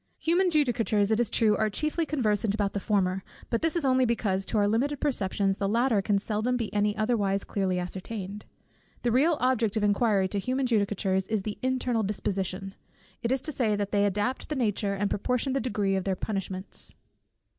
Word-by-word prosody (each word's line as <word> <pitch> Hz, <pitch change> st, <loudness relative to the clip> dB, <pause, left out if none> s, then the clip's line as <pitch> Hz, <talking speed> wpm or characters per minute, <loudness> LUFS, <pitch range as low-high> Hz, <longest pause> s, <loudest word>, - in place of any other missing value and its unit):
Human 355 Hz, +3 st, +2 dB
judicatures, 235 Hz, -, +2 dB
it 220 Hz, -, +2 dB
is 240 Hz, -, +2 dB
true, 215 Hz, -2 st, +3 dB
are 215 Hz, 0 st, +1 dB
chiefly 305 Hz, -, -1 dB
conversant 215 Hz, -7 st, +1 dB
about 205 Hz, -2 st, -1 dB
the 200 Hz, -, -1 dB
former, 190 Hz, -2 st, 0 dB, 0.3 s
but 230 Hz, -, +1 dB
this 325 Hz, +1 st, 0 dB
is 335 Hz, -4 st, 0 dB
only 260 Hz, -1 st, +4 dB
because 205 Hz, -5 st, 0 dB
to 225 Hz, -, -1 dB
our 205 Hz, -1 st, +3 dB
limited 265 Hz, +7 st, 0 dB
perceptions 200 Hz, -7 st, 0 dB
the 195 Hz, -, -1 dB
latter 230 Hz, -1 st, +2 dB
can 200 Hz, +1 st, +1 dB
seldom 220 Hz, +5 st, 0 dB
be 230 Hz, -3 st, -4 dB
any 210 Hz, +1 st, +1 dB
otherwise 210 Hz, -3 st, +1 dB
clearly 190 Hz, -2 st, -1 dB
ascertained. 190 Hz, +3 st, -5 dB, 0.6 s
The 240 Hz, -, +2 dB
real 295 Hz, +7 st, +3 dB
object 235 Hz, -4 st, +1 dB
of 215 Hz, -, 0 dB
inquiry 205 Hz, -1 st, +2 dB
to 200 Hz, -, -1 dB
human 255 Hz, +6 st, -1 dB
judicatures 200 Hz, -4 st, 0 dB
is 215 Hz, -3 st, -1 dB
the 210 Hz, 0 st, -5 dB
internal 255 Hz, -3 st, 0 dB
disposition; 195 Hz, -2 st, -2 dB, 0.5 s
it 235 Hz, -, -1 dB
is 265 Hz, -1 st, +2 dB
to 310 Hz, -, -4 dB
this 225 Hz, -7 st, +1 dB
that 205 Hz, -1 st, -2 dB
they 205 Hz, 0 st, +3 dB
adapt 205 Hz, +6 st, -2 dB
the 305 Hz, -, -2 dB
nature, 210 Hz, -5 st, 0 dB
and 205 Hz, +1 st, 0 dB
proportion 250 Hz, +6 st, -1 dB
the 275 Hz, -, +1 dB
degree, 205 Hz, -5 st, 0 dB
of 190 Hz, -, -1 dB
their 190 Hz, 0 st, 0 dB
punishments. 195 Hz, -1 st, -4 dB
210 Hz, 195 wpm, -27 LUFS, 200-250 Hz, 0.6 s, only